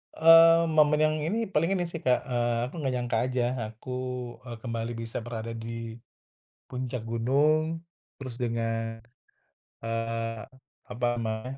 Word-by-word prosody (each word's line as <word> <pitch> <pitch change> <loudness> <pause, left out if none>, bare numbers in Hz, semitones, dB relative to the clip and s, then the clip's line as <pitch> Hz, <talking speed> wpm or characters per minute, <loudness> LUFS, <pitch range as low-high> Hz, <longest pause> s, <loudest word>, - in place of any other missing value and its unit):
Eee, 165 +1 +8
momen 150 -1 +4
yang 155 0 +3
ini, 210 +10 -1
paling 165 +3 +2
ini 180 - 0
sih, 165 - -5
Kak, 125 -3 +2
eee, 120 -2 0
aku - - -19
nggak 135 -4 -1
nyangka 120 -2 -1
aja 130 -1 0 0.3
aku, 115 +4 -10 0.6
eee, 120 -1 -6
kembali 115 -1 -3
bisa 115 0 -4
berada 115 -1 -5
di 115 0 -6 0.8
puncak 125 -2 -4
gunung 150 +8 +2 0.4
terus 130 -3 -7
dengan, 115 -2 -2 0.8
eee, 115 0 -2 0.5
apa 125 -1 -3
namanya, 115 +3 -3
120 Hz, 135 wpm, -28 LUFS, 115-150 Hz, 0.8 s, Eee